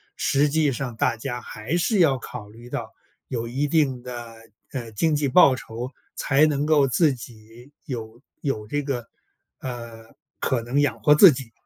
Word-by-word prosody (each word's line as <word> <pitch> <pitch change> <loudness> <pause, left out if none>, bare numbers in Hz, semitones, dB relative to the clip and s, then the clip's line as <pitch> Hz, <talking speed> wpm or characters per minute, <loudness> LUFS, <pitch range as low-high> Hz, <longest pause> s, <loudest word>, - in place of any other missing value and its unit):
实 140 +2 +2
际 150 -1 +2
上 125 -2 -4
大 115 - +1
家 120 +1 -5
还 110 +10 -4
是 190 +3 +1
要 140 -6 +4
考 115 -3 -9
虑 120 +3 -13
到 - - -5 0.4
有 115 -2 -3
一 135 +5 -1
定 140 -5 +1
的， 120 -2 -8 0.4
呃， 120 -4 -5
经 150 +9 +1
济 145 -1 +1
报 135 -1 +6
酬， 120 +2 -7 0.2
才 145 +2 +3
能 145 -1 0
够 150 -3 +4
自 145 +2 +3
己 115 +2 -13
有 115 -3 -7 0.2
有 110 -8 -2
这 145 +5 -1
个， 125 -5 -4 0.5
呃， 115 -3 -8 0.3
可 130 -3 0
能 120 +5 -1
养 145 -2 +1
活 150 - +6
自 175 +1 +9
己。 125 -3 -6
130 Hz, 185 characters per minute, -24 LUFS, 115-145 Hz, 0.5 s, 自